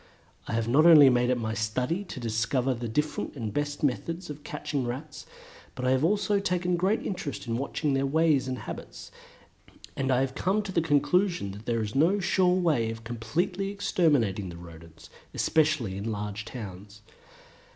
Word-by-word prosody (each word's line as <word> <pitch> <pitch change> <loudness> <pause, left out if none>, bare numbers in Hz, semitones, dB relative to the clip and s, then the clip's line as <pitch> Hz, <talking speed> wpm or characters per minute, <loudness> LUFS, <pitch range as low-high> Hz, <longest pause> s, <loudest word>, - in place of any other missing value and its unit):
I - - -4
have 115 0 0
not 145 +7 +5
only 150 -5 +9
made 125 0 +2
it 125 - +2
my 110 -2 -2
study 125 - -1
to 140 - -7
discover 120 +3 0
the 120 -1 -5
different 150 +8 -2
and 115 -5 -4
the - - -7
best 145 +4 -3
methods 165 +5 -2
of 145 0 -10
catching 140 -2 -3
Rats, 140 +5 -6 0.5
but 125 - -4
I 130 - +3
have 130 +2 +2
also 200 +3 +2
taken 180 -2 0
great 190 +6 0
interest 180 -10 -4
in 115 -1 -2
watching 140 +1 -1
their 135 0 +1
ways 155 -2 +2
and 130 -1 -3
habits, 110 - -8 0.8
and 135 -1 0
I 130 +1 +3
come 190 +10 -1
to 200 - -5
the 170 - +2
conclusion 160 - +1
that 105 +3 -11
there 115 -2 0
is 105 0 -5
no 170 +9 +3
sure 180 -1 +2
way 150 -11 +1
of 115 0 -7
completely 160 - -2
exterminating 145 - +1
the 85 - -9
Rodents, 85 -1 -13 0.2
especially 155 -11 +1
in 105 +4 -3
large 105 0 -4
towns. 105 -2 -9
135 Hz, 180 wpm, -27 LUFS, 115-165 Hz, 0.8 s, only